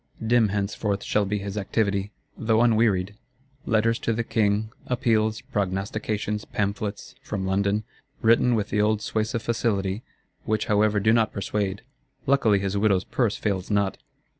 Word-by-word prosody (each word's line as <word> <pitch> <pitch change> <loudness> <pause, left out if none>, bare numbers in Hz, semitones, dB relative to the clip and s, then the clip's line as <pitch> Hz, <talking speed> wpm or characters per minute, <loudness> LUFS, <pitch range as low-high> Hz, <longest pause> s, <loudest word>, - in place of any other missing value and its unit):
Dim 115 -1 +4
henceforth 100 0 -2
shall 105 -1 +1
be 105 +2 -1
his 100 0 -5
activity, 100 0 0 0.2
though 110 0 +2
unwearied: 110 -5 +3 0.5
Letters 115 +1 +2
to 115 - 0
the 115 +1 -1
King, 110 -1 +1 0.2
Appeals, 110 -3 +1
Prognostications; 105 +2 -2
Pamphlets 100 0 -3
(from 95 -2 -4
London), 100 +2 +1 0.4
written 115 +2 +4
with 105 -1 -1
the 105 - +1
old 105 0 +2
suasive 110 +1 -1
facility; 105 -4 0 0.4
which 110 -1 0
however 105 0 +3
do 110 +2 +3
not 115 -2 +3
persuade. 100 0 -2 0.4
Luckily 130 -7 +4
his 100 0 -2
widow's 100 -2 +2
purse 115 -5 0
fails 95 -3 -2
not. 100 -2 0
105 Hz, 140 wpm, -25 LUFS, 100-110 Hz, 0.5 s, Dim